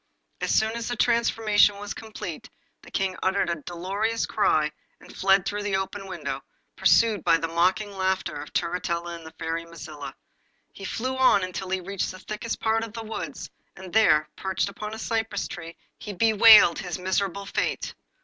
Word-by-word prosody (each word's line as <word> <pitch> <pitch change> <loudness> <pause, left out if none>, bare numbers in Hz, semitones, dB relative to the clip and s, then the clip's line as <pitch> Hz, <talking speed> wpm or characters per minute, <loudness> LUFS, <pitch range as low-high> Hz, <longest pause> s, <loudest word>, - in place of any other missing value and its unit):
As - - -2
soon 220 0 +3
as 235 0 -4
the 245 - -2
transformation 220 -3 +3
was 205 0 -5
complete 215 0 -7 0.3
the - - -14
King 190 -1 -1
uttered 190 -2 +1
a 170 -3 -4
dolorous 200 +6 -1
cry 155 -7 +2 0.3
and - - -15
fled 195 -1 +3
through 205 +1 -2
the 205 -1 -1
open 195 +1 -3
window, 185 -2 -4 0.3
pursued 220 -6 +4
by 165 - +5
the 165 - -2
mocking 185 +5 +1
laughter 190 -3 0
of 150 - -10
Turritella 170 0 -2
and 165 -1 -12
the 160 - -12
Fairy 165 +1 -3
Mazilla. 155 -4 -9 0.6
He 195 - -9
flew 255 +6 -2
on 255 -7 +5
until 185 +1 -4
he 190 0 -1
reached 195 +1 -3
the 185 - -8
thickest 215 +4 -5
part 225 0 +1
of 225 -2 -7
the 230 -1 -6
wood, 220 0 -5 0.4
and 190 -2 -10
there, 155 -9 +5
perched 190 +1 -1
upon 210 +2 -6
a - - -7
cypress 225 -2 -2
tree, 165 -2 -8 0.2
he 210 - -6
bewailed 215 -3 +7
his 180 -3 -4
miserable 190 +1 -1
fate. - - -2
195 Hz, 180 wpm, -26 LUFS, 175-220 Hz, 0.6 s, bewailed